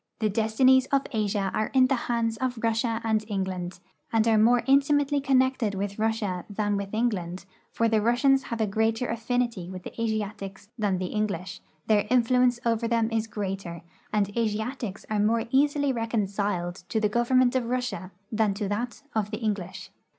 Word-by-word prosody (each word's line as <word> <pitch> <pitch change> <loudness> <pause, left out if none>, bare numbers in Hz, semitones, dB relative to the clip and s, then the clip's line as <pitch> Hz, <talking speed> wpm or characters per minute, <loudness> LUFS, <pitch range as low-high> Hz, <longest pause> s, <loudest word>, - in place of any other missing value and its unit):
The 215 -1 0
destinies 250 +5 +3
of 275 -1 +2
Asia 205 -4 0
are 215 - 0
in 260 -1 +7
the 260 - +1 0.2
hands 230 -1 +1
of 255 0 -2
Russia 225 0 0
and 220 -1 +1
England, 190 -3 -3 0.3
and 225 -1 +2
are 225 - +4
more 240 +2 +4
intimately 280 +1 +3
connected 260 -5 +2
with 200 +1 -4
Russia 215 -5 -1
than 205 0 -1
with 200 -1 -3
Eng 230 +3 +2
land, 180 -3 -5 0.3
for 230 - +1
the 220 -1 +2
Russians 265 +4 +3
have 220 -3 -2
greater 225 +3 +1
affinity 230 -5 -1
with 185 -1 -8
the - - -8
Asiatics 210 -3 -3
than 205 -5 0
the 180 -1 -4
English, 210 -3 -3 0.2
their 210 -2 +2
influence 250 0 +3
over 230 0 +1
them 230 -1 +1
is 225 0 0
greater, 195 -5 -5 0.3
and 210 -1 +2
the 205 +4 -5
Asiatics 220 -1 -3
are 215 -1 -1
more 225 +2 +2
easily 285 0 +2
reconciled 200 -6 -1
to 220 - 0
the 215 - +2
government 245 +3 +2
of 255 -2 +1
Russia 245 -7 -2 0.2
than 215 -3 +1
to 205 0 -2
that 240 +6 -3
of 215 -2 0
the 215 - -4
English. 190 -4 -4
220 Hz, 175 wpm, -26 LUFS, 205-245 Hz, 0.3 s, in